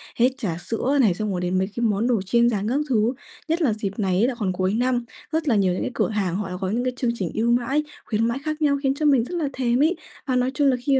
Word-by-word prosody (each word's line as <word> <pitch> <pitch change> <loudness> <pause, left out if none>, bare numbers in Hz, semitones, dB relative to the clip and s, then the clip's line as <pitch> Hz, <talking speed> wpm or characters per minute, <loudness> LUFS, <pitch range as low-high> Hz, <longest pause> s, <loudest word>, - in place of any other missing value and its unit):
hết 245 +2 +4
trả 185 -11 -2
sữa 245 +9 -1
này, 210 -8 +4
xong 210 +3 -3
rồi 180 -1 -2
đến 180 +1 0
mấy 190 - +1
cái 240 - -2
món 215 +2 +1
đồ 235 -5 +2
chiên 235 +5 +3
rán 210 -2 -1
các 265 +4 +1
thứ, 230 0 +2 0.3
nhất 330 +2 0
là 265 -9 +3
dịp 205 -1 -4
này 190 -2 +1
á 235 - +4
là 260 - -2
còn 190 -4 0
cuối 185 +1 0
năm, 245 +1 +1 0.3
rất 320 0 -1
là 245 - +3
nhiều 190 -3 +3
những 180 - -3
cái - - -2
cửa - - 0
hàng 200 -5 -1
họ 195 -1 -3
đã 180 - -4
có 190 - -1
những 235 +5 0
cái 255 0 -1
chương 245 -2 +1
trình 185 -7 -3
ưu 230 +2 +1
mãi, 250 +5 +1 0.2
khuyến 225 +1 +1
mãi 235 +3 -1
khác 310 0 -3
nhau 285 -2 +3
khiến 270 -1 +2
cho 305 - -2
mình 275 -5 +5
là 335 -5 -1
thèm 245 -1 +1
ấy. 330 +4 +3 0.3
Và 260 - +1
nói 250 +1 +1
chung 285 +1 +2
là 265 - +4
khi 280 - +3
235 Hz, 300 wpm, -23 LUFS, 200-265 Hz, 0.3 s, mình